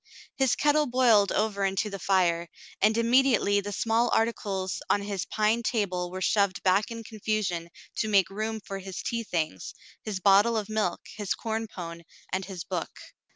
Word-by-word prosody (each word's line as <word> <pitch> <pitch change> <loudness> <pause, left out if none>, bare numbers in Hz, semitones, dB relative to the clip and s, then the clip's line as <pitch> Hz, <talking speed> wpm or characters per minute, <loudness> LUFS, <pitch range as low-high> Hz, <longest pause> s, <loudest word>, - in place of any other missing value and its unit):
His 265 -3 +2
kettle 295 0 +3
boiled 240 -6 +4
over 210 -2 0
into 195 +2 0
the 195 - -5
fire, 175 -3 +1 0.3
and 215 +2 +4
immediately 230 -4 +3
the 205 +1 -5
small 230 +3 +1
articles 195 -4 -1
on 200 - +2
his 200 -3 -3
pine 215 +2 +1
table 190 -7 -1
were 185 +1 -6
shoved 200 -2 +1
back 190 +3 +3
in 230 -1 -6
confusion 210 -6 -2 0.3
to 220 - 0
make 195 -3 +3
room 215 +2 -3
for 195 -1 -6
his 190 -1 -7
tea 230 -1 -2
things, 155 - -3 0.3
his 210 -4 -4
bottle 205 +4 +5
of 215 -1 -3
milk, 215 -5 -1 0.2
his 205 -3 -1
corn 225 0 -3
pone, 170 -4 -8 0.3
and 190 0 -1
his 185 -3 -6
book. - - -3
205 Hz, 170 wpm, -27 LUFS, 190-225 Hz, 0.3 s, bottle